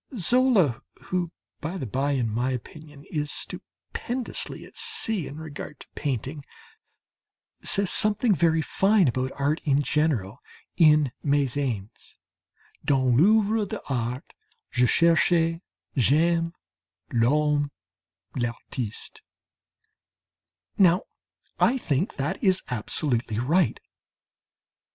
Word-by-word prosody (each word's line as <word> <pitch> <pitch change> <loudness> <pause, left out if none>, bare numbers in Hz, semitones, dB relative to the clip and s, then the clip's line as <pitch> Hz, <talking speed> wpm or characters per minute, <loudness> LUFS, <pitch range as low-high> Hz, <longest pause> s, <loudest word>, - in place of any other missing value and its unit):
Zola, 195 - +3 0.2
who, 180 -2 -3 0.3
by 165 +5 -4
the 135 - -4
bye, 135 +5 -1
in 125 -4 0
my 120 +4 -1
opinion, 145 +3 -8
is 150 -2 -2
stupendously 245 +1 -4
at - - -17
sea 440 - -1
in 145 - -9
regard 155 -1 -8
to - - -12
painting, 140 +1 -4 1.2
says 200 -2 +4
something 215 +1 +4
very 160 -1 +2
fine 195 0 +3
about 130 +1 -1
art 145 +4 0
in 145 -2 +2
general 135 -9 0 0.4
in 150 -5 +4
"Mes 140 -3 +1
Haines": 115 -8 -4 0.7
"Dans 130 -3 +2
l'œuvre 210 - +3
d'art 125 -1 -3 0.5
je 125 0 +3
cherche, 165 +2 +3 0.3
j'aime 165 +6 +2 0.6
l'homme, 145 +4 +2 0.7
l'artiste." 120 -2 -5 1.6
Now 180 0 +5 0.6
I 260 - +3
think 160 - -1
that 150 +7 -3
is 190 -1 +3
absolutely 120 -1 -1
right. 145 +4 +1
150 Hz, 100 wpm, -25 LUFS, 130-175 Hz, 1.6 s, Now